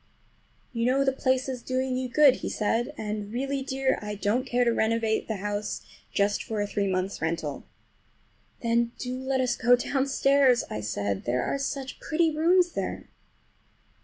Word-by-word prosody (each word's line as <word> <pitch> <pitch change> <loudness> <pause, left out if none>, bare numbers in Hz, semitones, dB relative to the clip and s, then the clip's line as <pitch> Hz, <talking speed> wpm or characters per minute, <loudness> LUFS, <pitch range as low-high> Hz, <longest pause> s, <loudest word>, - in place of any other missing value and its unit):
"You 230 0 0
know 270 +2 +3
the 270 - +3
place 260 0 0
is 255 -2 -4
doing 255 0 -1
you 255 0 -2
good," 275 0 +6
he - - -4
said, 230 +5 0
"and 210 -1 -4
really, 275 +3 -2
dear, 265 0 0
I 210 0 -4
don't 220 +6 0
care 245 0 +2
to 235 -1 +2
renovate 225 0 +1
the 220 - -2
house 205 +1 -3 0.3
just 200 0 +1
for 220 -2 -4
a 205 - +1
three 205 -1 -1
months' 185 +1 -2
rental." 160 -3 -3 1.0
"Then 235 0 +1
do 250 0 -4
let 265 0 -1
us 250 -2 +1
go 245 0 +5
downstairs," 275 -1 +3
I 105 - -3
said, 100 -1 -2
"there 125 +1 0
are 275 - -1
such 275 -1 -4
pretty 320 -1 +1
rooms 350 +3 +4
there." - - -4
245 Hz, 170 wpm, -27 LUFS, 210-265 Hz, 1.0 s, good